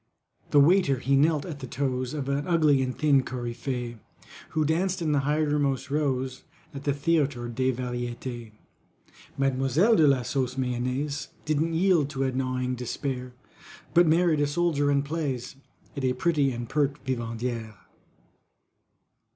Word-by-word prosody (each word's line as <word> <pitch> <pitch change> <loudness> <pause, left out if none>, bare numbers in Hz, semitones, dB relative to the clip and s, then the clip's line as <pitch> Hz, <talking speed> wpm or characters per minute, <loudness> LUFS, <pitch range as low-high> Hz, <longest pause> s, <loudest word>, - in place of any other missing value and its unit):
The 145 - +5
waiter 155 -2 +4
he 135 +2 +1
knelt 150 +1 +3
at 155 -5 -6
the 130 - -7
toes 130 +1 -2
Of 140 -3 -3
an 140 +1 -1
ugly 155 -6 +4
and 130 -1 -2
thin 145 -3 +4
coryphée, 120 -1 -4 0.5
Who 155 -1 0
danced 180 +5 0
in 160 -3 0
the 145 - +3
hindermost 145 -2 0
rows 135 -3 -1 0.3
At 140 0 -8
the 145 - +2
Théatre 140 -5 0
des 130 +2 +1
Variétés. 120 -1 -5 0.9
MADEMOISELLE 135 - +3
DE 155 - +6
LA 135 -3 +3
SAUCE 130 +1 -2
MAYONNAISE 130 +3 -2 0.2
Didn't 155 +2 0
yield 170 -5 +3
to 135 -2 -2
a 130 - 0
gnawing 130 0 -1
despair 125 +1 -4 0.6
But 175 0 +6
married 165 -1 +3
a 145 - +2
soldier, 145 -2 +1
and 140 0 +2
plays 140 -5 -3 0.4
As 140 - -4
a 130 -1 +2
pretty 145 0 +1
and 120 -1 -5
pert 145 +1 -1
Vivandière. 115 -2 -3
135 Hz, 145 wpm, -27 LUFS, 125-150 Hz, 0.9 s, DE